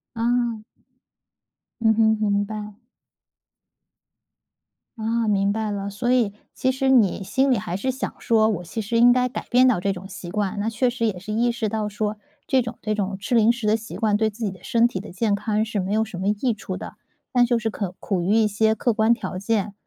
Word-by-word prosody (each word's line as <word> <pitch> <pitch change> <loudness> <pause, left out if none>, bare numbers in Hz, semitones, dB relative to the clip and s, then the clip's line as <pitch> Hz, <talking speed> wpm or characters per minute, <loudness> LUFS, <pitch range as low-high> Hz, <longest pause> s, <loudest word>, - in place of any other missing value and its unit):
啊。 235 -1 0 1.2
嗯 220 -1 +4
哼， 220 0 +3 0.2
明 200 0 +2
白。 210 +1 -7 2.2
啊， 225 +1 0
明 200 -1 +2
白 220 0 -2
了， 200 -1 -3
所 240 +5 -1
以 235 -5 +2 0.2
其 260 - +1
实 265 +1 0
你 220 -7 +4
心 265 +7 +1
里 250 - +4
还 180 -3 -3
是 260 +7 -1
想 260 +2 -4
说， 220 -1 +3
我 180 -5 -2
其 220 +6 -4
实 230 +3 -1
应 240 +1 +7
该 250 0 +3
改 250 - -6
变 255 +1 +5
到 240 -9 +3
这 200 - 0
种 190 +1 -8
习 190 -3 -8
惯。 205 0 -2
那 215 - -1
确 245 +3 +1
实 235 -2 -1
也 190 -4 -2
是 205 +4 -6
意 235 +3 +2
识 230 -2 -2
到 215 -1 -2
说， 210 0 -3 0.3
这 265 - +3
种 235 0 -5
这 215 0 -1
种 200 -2 -2
吃 205 +5 -2
零 225 -1 +5
食 240 -2 -5
的 210 - +4
习 220 0 -9
惯， 210 -2 +1
对 220 - +2
自 220 +2 -6
己 205 - 0
的 185 -1 -13
身 235 0 +3
体 195 -6 -3
的 210 - -9
健 205 +3 0
康 215 +1 0
是 215 -2 -2
没 185 - -3
有 220 +1 +2
什 205 -5 -8
么 190 - 0
益 210 +4 +1
处 195 -3 -6
的， - - -8 0.4
但 245 -1 +4
就 240 -1 +2
是 225 0 -2
可 195 -4 -4
苦 195 -4 -1
于 185 +5 +1
一 220 -1 +4
些 220 +1 +2
客 240 +1 +1
观 220 +2 +3
条 215 -5 -5
件， 205 0 -1
220 Hz, 240 characters per minute, -23 LUFS, 200-235 Hz, 2.2 s, 应